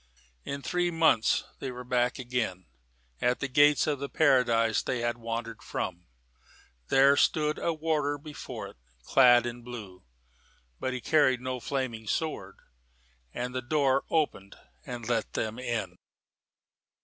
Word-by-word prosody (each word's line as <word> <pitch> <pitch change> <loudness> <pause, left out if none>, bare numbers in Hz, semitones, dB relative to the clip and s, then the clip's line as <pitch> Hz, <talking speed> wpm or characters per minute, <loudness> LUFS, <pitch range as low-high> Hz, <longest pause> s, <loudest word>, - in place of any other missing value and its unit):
In 140 0 -5
three 180 0 0
months 160 -9 +3 0.2
they 135 - -4
were 125 0 -7
back 125 0 0
again 120 -8 -3 0.6
at 125 0 +1
the 140 - -2
gates 145 +2 +4
of 145 -3 -1
the 140 0 -4
paradise 120 -7 +3
they 125 -2 -2
had 120 0 -1
wandered 115 0 -5
from. 90 0 -5 0.8
There 135 +1 +5
stood 150 +1 +2
a 170 - 0
warder 155 -2 -1
before 150 +1 -8
it, - - -17 0.3
clad 120 - +6
in 120 0 -5
blue: 110 -7 -9 0.8
but 130 - -2
he 125 - -4
carried 130 -2 +3
no 130 0 -4
flaming 120 -4 -3
sword, 100 -10 -2 0.8
and 125 - -4
the 130 - -2
door 135 0 +2
opened 145 -11 -1 0.3
and 120 -2 -6
let 120 -1 -1
them 110 +2 -3
in. 120 -3 -3
125 Hz, 140 wpm, -28 LUFS, 115-145 Hz, 0.8 s, clad